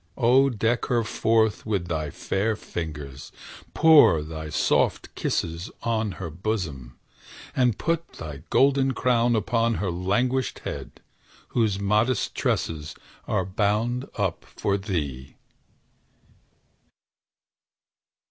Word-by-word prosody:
O 130 Hz, +4 st, +5 dB
deck 115 Hz, 0 st, 0 dB
her 120 Hz, -2 st, +1 dB
forth 110 Hz, -1 st, +1 dB
with 100 Hz, -5 st, -1 dB
thy 80 Hz, -3 st, -2 dB
fair 100 Hz, +9 st, -1 dB
fingers; 75 Hz, -8 st, -7 dB, 0.4 s
pour 150 Hz, -, +7 dB
Thy 80 Hz, 0 st, -6 dB
soft -, -, +1 dB
kisses 85 Hz, +1 st, -2 dB
on 110 Hz, -3 st, 0 dB
her 85 Hz, -3 st, -6 dB
bosom; 80 Hz, -, -4 dB, 0.6 s
and 125 Hz, -4 st, +2 dB
put 165 Hz, 0 st, -2 dB
Thy 75 Hz, -2 st, -8 dB
golden 135 Hz, 0 st, +3 dB
crown 120 Hz, -2 st, +2 dB
upon 115 Hz, +2 st, +1 dB
her 95 Hz, -4 st, -1 dB
languished 120 Hz, +9 st, 0 dB
head, -, -, -6 dB, 0.5 s
Whose 110 Hz, -5 st, +1 dB
modest 105 Hz, +4 st, +1 dB
tresses 75 Hz, -2 st, -2 dB, 0.3 s
are 95 Hz, -, 0 dB
bound 110 Hz, +6 st, 0 dB
up 95 Hz, -5 st, -1 dB
for 100 Hz, -, -2 dB
thee! 75 Hz, -10 st, -4 dB
105 Hz, 105 wpm, -25 LUFS, 85-120 Hz, 0.6 s, pour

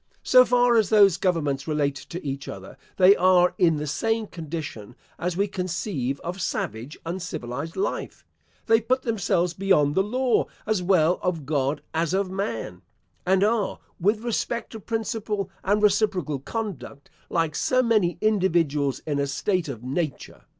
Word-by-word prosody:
So 255 Hz, 0 st, +7 dB
far 245 Hz, -1 st, +4 dB
as 215 Hz, -4 st, +3 dB
those 200 Hz, -5 st, +6 dB
governments 165 Hz, -8 st, -1 dB
relate 150 Hz, -2 st, +1 dB
to 170 Hz, +4 st, -8 dB
each 140 Hz, 0 st, -4 dB
other, -, -, -8 dB, 0.2 s
they 190 Hz, +1 st, +7 dB
are 180 Hz, -1 st, +4 dB
in 165 Hz, -3 st, +4 dB
the 150 Hz, 0 st, -3 dB
same 225 Hz, +10 st, -1 dB
condition 155 Hz, -, -7 dB, 0.2 s
as 175 Hz, 0 st, -2 dB
we 200 Hz, +1 st, +2 dB
conceive 170 Hz, -, -3 dB
of 180 Hz, +3 st, -5 dB
savage 120 Hz, 0 st, -3 dB
uncivilised 165 Hz, -4 st, -5 dB
life; 195 Hz, -, -3 dB, 0.4 s
they 225 Hz, 0 st, +4 dB
put 255 Hz, +4 st, 0 dB
themselves 180 Hz, -6 st, 0 dB
beyond 175 Hz, -6 st, +2 dB
the 190 Hz, -, +3 dB
law 250 Hz, +4 st, +1 dB, 0.2 s
as 215 Hz, -4 st, 0 dB
well 180 Hz, -2 st, +3 dB
of 165 Hz, -5 st, -2 dB
God 140 Hz, 0 st, -1 dB
as 165 Hz, +2 st, 0 dB
of 195 Hz, -1 st, -1 dB
man, 115 Hz, -, -4 dB, 0.5 s
and 190 Hz, +1 st, +4 dB
are, 215 Hz, -1 st, +1 dB, 0.2 s
with 210 Hz, +5 st, +1 dB
respect 235 Hz, 0 st, -2 dB
to 225 Hz, -, -7 dB
principle 215 Hz, -2 st, -3 dB
and 205 Hz, +2 st, +1 dB
reciprocal 190 Hz, -8 st, +2 dB
conduct, 185 Hz, -, -6 dB, 0.2 s
like 165 Hz, -2 st, 0 dB
so 255 Hz, +10 st, +2 dB
many 215 Hz, -7 st, +2 dB
individuals 170 Hz, -10 st, +1 dB
in 145 Hz, -2 st, -1 dB
a 140 Hz, -, 0 dB
state 180 Hz, +4 st, -1 dB
of 120 Hz, -5 st, -7 dB
nature. 140 Hz, +3 st, -4 dB
180 Hz, 155 wpm, -25 LUFS, 150-210 Hz, 0.5 s, So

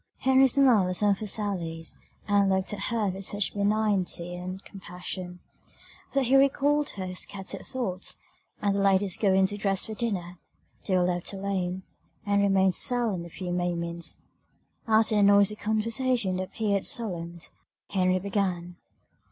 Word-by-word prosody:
Henry 265 Hz, 0 st, +5 dB
smiled 250 Hz, -8 st, +4 dB
at 185 Hz, -, -2 dB
some 205 Hz, +2 st, +4 dB
of 195 Hz, -, 0 dB
her 215 Hz, -, -4 dB
sallies, 175 Hz, -6 st, -2 dB, 0.3 s
and 200 Hz, -1 st, +3 dB
looked 190 Hz, +1 st, 0 dB
at 200 Hz, -1 st, -2 dB
her 225 Hz, -3 st, 0 dB
with 190 Hz, +1 st, -5 dB
such 205 Hz, +1 st, 0 dB
benignity 200 Hz, -4 st, 0 dB
and 185 Hz, +2 st, -7 dB
compassion, 180 Hz, -1 st, -7 dB, 0.7 s
that 275 Hz, -1 st, +2 dB
he 260 Hz, +3 st, +3 dB
recalled 285 Hz, +2 st, +3 dB
her 185 Hz, -1 st, -4 dB
scattered 195 Hz, +1 st, -3 dB
thoughts; 190 Hz, -8 st, -3 dB, 0.5 s
and, 200 Hz, -1 st, +2 dB
the 200 Hz, -, 0 dB
ladies 195 Hz, -1 st, +3 dB
going 195 Hz, -2 st, +3 dB
to 205 Hz, +2 st, -2 dB
dress 195 Hz, -2 st, 0 dB
for 220 Hz, -, -6 dB
dinner, 185 Hz, -6 st, -3 dB, 0.5 s
they 185 Hz, -2 st, +2 dB
were 180 Hz, -, +3 dB
left 175 Hz, +1 st, -1 dB
alone; 190 Hz, -2 st, -3 dB, 0.4 s
and 200 Hz, 0 st, +2 dB
remained 190 Hz, -2 st, +3 dB
silent 220 Hz, -7 st, 0 dB
a -, -, -12 dB
few 180 Hz, +1 st, -6 dB
moments: 170 Hz, -1 st, -2 dB, 0.6 s
after 220 Hz, 0 st, +3 dB
the 210 Hz, -, +3 dB
noisy 200 Hz, +1 st, +5 dB
conversation 220 Hz, -2 st, 0 dB
it 185 Hz, -, -2 dB
appeared 200 Hz, -3 st, -1 dB
solemn. 175 Hz, -10 st, -3 dB, 0.5 s
Henry 185 Hz, -1 st, +2 dB
began. 185 Hz, -3 st, -2 dB
195 Hz, 150 wpm, -27 LUFS, 180-215 Hz, 0.7 s, Henry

